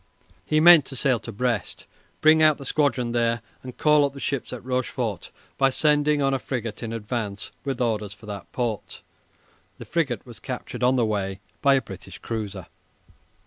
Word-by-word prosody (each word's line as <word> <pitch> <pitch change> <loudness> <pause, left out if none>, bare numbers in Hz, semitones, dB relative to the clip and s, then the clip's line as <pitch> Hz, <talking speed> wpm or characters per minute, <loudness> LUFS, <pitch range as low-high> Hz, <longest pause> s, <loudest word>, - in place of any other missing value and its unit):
He 155 - +2
meant 170 -1 +8
to 135 - -9
sail 130 -2 +2
to 115 - -8
Brest, 115 -1 -2 0.4
bring 155 +1 +6
out 155 -1 +5
the 140 - -9
squadron 135 -4 +1
there, 115 -1 +1 0.2
and 125 -1 -9
call 150 -1 +5
up 140 -1 0
the 140 - -9
ships 135 -2 -3
at 125 -1 -7
Rochefort 125 -6 -2 0.3
by 135 0 +5
sending 150 +1 +2
on 135 0 +2
a 135 - 0
frigate 115 -6 -4
in 115 -2 -4
advance 110 -2 -4
with 135 -3 -3
orders 110 -4 0
for 105 +1 -13
that 100 -2 -8
port. 120 -4 -3 0.7
(The - - -9
frigate 140 -10 -1
was 120 -5 -12
captured 130 +3 -6
on 125 +1 +4
the 120 -3 +3
way 100 -3 -2 0.2
by 140 -1 +5
a 135 - +1
British 95 0 -10
cruiser.) 105 -5 -5
125 Hz, 185 wpm, -25 LUFS, 110-140 Hz, 0.7 s, meant